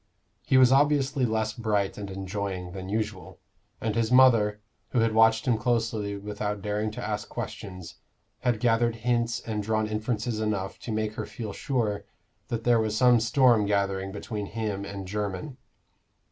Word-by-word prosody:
He 130 - +4
was 130 -1 +7
obviously 140 -1 +3
less 110 0 -1
bright 105 -4 0
and 100 -1 -6
enjoying 95 -1 -4
than 95 0 -7
usual, 105 -5 -3 0.4
and 110 -1 -1
his 115 +1 0
mother, 115 -5 +5 0.3
who 115 -3 +2
watched 115 0 +4
him 115 -3 +2
closely 115 -3 0
without 105 0 -4
daring 105 +1 -1
to - - -5
ask - - -3
questions, 90 -3 -7 0.4
had 120 -4 0
gathered 115 0 +2
hints 120 -1 +1
and 110 -2 -3
drawn 110 +1 0
inferences 110 +1 -2
enough 105 -3 -2
to 120 - -6
make 110 0 -1
her - - -5
feel 110 -5 -6
sure 110 -6 -1 0.4
that 115 -1 -3
there 120 -1 +4
was 110 -1 0
some 125 -1 +6
storm 115 -2 +4
gathering 100 -1 0
between 105 0 -5
him 105 -3 -3
and 100 -1 -6
Jermyn. 105 +7 -4
110 Hz, 160 wpm, -27 LUFS, 100-115 Hz, 0.4 s, was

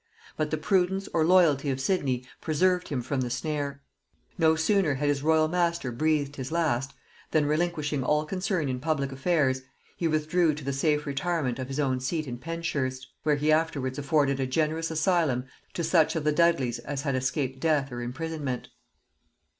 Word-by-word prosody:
But 155 -1 -1
the 155 - -1
prudence 190 +3 +1
or 160 - +3
loyalty 160 -5 +4
of 135 -1 -1
Sidney 135 -6 0 0.2
preserved 180 +3 +1
him 130 -4 -2
from 130 +1 -1
the 125 - -2
snare. 140 +2 -3 0.5
No 160 0 +4
sooner 160 -2 +2
had 145 +2 -1
his 140 -1 0
royal 155 +1 +3
master 170 -5 0
breathed 145 +2 0
his 130 0 -5
last, 140 -5 0 0.3
than, 155 -2 +2
relinquishing 150 -2 0
all 150 +3 +1
concern 185 -2 -1
in 130 -1 -2
public 140 -1 -1
affairs, 135 -2 +1 0.3
he 170 - 0
withdrew 155 +1 +2
to 150 - -8
the 140 +1 -2
safe 150 +2 +1
retirement 140 -2 -1
of 130 - -4
his 135 +2 -4
own 130 -3 +1
seat 150 +4 -2
at 120 -1 -5
Penshurst, 140 -6 -3
where 150 -1 +2
he 150 +2 +1
afterwards 150 -4 0
afforded 140 -1 +1
a 130 - 0
generous 160 +4 0
asylum 160 -5 +1 0.3
to 170 - -1
such 165 -2 +3
of 160 - -1
the 150 - +2
Dudleys 150 -7 +2
as 140 -1 -4
had 140 -3 0
escaped 130 +1 -1
death 145 -3 +1
or 120 0 -5
imprisonment. 140 0 -4
150 Hz, 180 wpm, -27 LUFS, 135-160 Hz, 0.5 s, loyalty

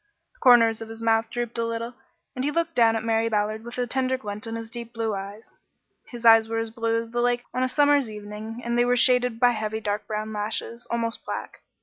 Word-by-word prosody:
The - - -30
corners 230 -3 +5
of 225 - -7
his 225 0 -7
mouth 225 0 +2
drooped 240 -1 -3
a - - +1
little, 230 +1 -3 0.4
and 255 - -3
he 285 - +1
looked 335 +2 -1
down 230 -4 +4
at 225 - -2
Mary 225 0 +1
Ballard 215 0 -1
with 240 +1 -7
a 250 - 0
tender 260 +1 0
glint 210 -2 -6
in 225 - -4
his 230 0 -6
deep 235 0 -8
blue 225 -2 -2
eyes. 200 +2 -7 0.5
His 240 -2 -9
eyes 225 -1 +7
were 225 - -2
as 225 0 -2
blue 230 0 0
as 230 0 -7
the 240 0 0
lake 245 0 +1
on 255 - -1
a 255 - +1
summer's 285 -2 +3
evening, 215 +2 -8
and 235 0 -1
they 240 - +4
were 245 0 +2
shaded 250 -2 +3
by 245 0 +5
heavy 220 -1 -3
dark 210 -1 -3
brown 215 0 -3
lashes, 220 +3 -3
almost 230 -1 -2
black. - - -6
230 Hz, 240 wpm, -25 LUFS, 220-245 Hz, 0.5 s, eyes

